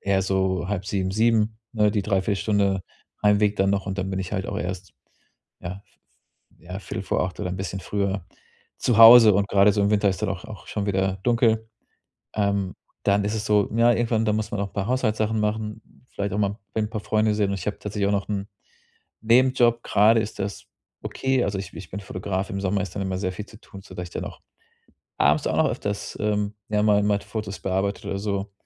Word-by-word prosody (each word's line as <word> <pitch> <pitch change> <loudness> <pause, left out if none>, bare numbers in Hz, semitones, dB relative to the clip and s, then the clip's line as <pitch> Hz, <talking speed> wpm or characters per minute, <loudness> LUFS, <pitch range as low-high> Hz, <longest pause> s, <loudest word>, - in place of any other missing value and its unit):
eher 100 -1 +1
so 95 -1 0
6:30, 95 -1 -2
7:00, 110 +1 +2
ne? 105 -2 +3
Die 105 - 0
Dreiviertelstunde 100 0 +1 0.4
Heimweg 105 0 +3
dann 95 0 +2
noch 100 -1 0
und 95 0 -4
dann 95 0 -2
bin 95 - -2
ich 95 0 -6
halt 95 -2 -2
auch - - -4
erst, 90 0 -5 0.7
ja 90 +3 -7 0.8
ja, 90 +3 -8
viertel 95 - -5
vor - - 0
7:45 90 0 -2
oder 90 - -2
'n 90 - -4
bisschen 95 0 -4
früher 100 -2 -2 0.5
zu 120 - +1
Hause 115 -2 +10
und 100 +1 +2
grade 100 +1 +5
so 100 - +1
im 100 - +2
Winter 105 -1 +3
ist 95 - -5
dann 105 - 0
auch 95 -1 -5
auch 105 - -10
schon 105 -1 -3
wieder 95 -1 0
dunkel. 115 -2 +2 0.7
Ähm, 100 -2 0 0.3
dann 100 0 +3
ist 105 +2 -1
es 110 -1 -3
so, 105 -2 +2
ja 120 +1 +5
irgendwann, 115 -1 +1
da 105 - +2
muss 110 0 -2
man 105 - -2
auch 100 - -1
'n - - -33
paar 100 -1 -2
Haushaltssachen 110 -3 0
machen, 105 +1 -2 0.3
v - - -34
vielleicht 100 -1 -2
auch - - -1
mal 100 0 0 0.2
'n 110 -1 0
paar 110 - -3
Freunde 110 0 +1
sehen 105 -2 +1
und - - -1
ich 90 - -8
habe 105 - -2
tatsächlich 105 -1 -2
auch 100 - +1
noch 100 -1 -1
'n 100 -1 -3 0.7
Nebenjob. 120 0 +4
Grade 110 +3 +4
ist 110 -1 -5
das 100 +1 -4 0.4
okay, 130 -2 0
also 100 0 -2
ich 95 -1 -6
ich 90 - -9
bin 100 - -5
Fotograf. 95 0 -4
Im 100 - -3
Sommer 100 0 0
ist 95 -3 -7
dann 100 - -1
immer 95 -1 -2
sehr 95 -1 -2
viel 100 +3 -7
zu 110 - -15
tun, 100 - -12
sodass 95 -2 -7
ich 85 - -10
dann - - -4
auch - - -9 0.8
abends - - +3
auch - - -1
noch - - +3
öfters, 100 0 -4
ähm, 105 0 -1
ja, 105 -1 +1
mal 105 -1 +4
mal 105 0 +2
die - - -15
Fotos 105 -3 -5
bearbeite 95 +1 -2
oder 100 - -2
so. 100 0 -3
100 Hz, 220 wpm, -24 LUFS, 95-105 Hz, 0.8 s, Hause